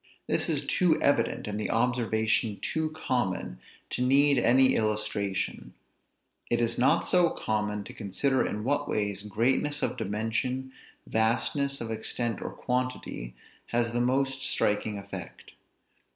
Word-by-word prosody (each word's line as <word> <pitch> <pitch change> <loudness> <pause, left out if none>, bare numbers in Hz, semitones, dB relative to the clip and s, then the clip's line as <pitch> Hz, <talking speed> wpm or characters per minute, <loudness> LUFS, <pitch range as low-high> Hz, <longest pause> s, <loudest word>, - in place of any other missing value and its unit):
This - - +1
is - - 0
too 175 -4 +2
evident, 120 -7 +1
and 105 0 -3
the 105 - -2
observation 115 -3 +1
too 160 0 -1
common, 120 - -2 0.3
to - - -2
need 140 +2 +5
any 130 +2 +5
illustration; 105 -3 -2 0.7
it 120 - +2
is 115 0 +1
not 125 - +4
so 175 -2 +4
common 105 -1 -2
to - - -10
consider 130 +6 0
in 105 +1 -3
what 145 +4 0
ways 100 -2 -1
greatness 125 +8 +1
of - - -1
dimension, 115 +5 -2 0.3
vastness 140 +5 0
of 115 -1 -4
extent 115 0 -1
or - - -3
quantity, 125 - -3 0.3
has 120 -1 0
the 120 +1 0
most 135 +2 +1
striking 105 -3 0
effect. 100 0 -9
120 Hz, 135 wpm, -28 LUFS, 105-130 Hz, 0.7 s, need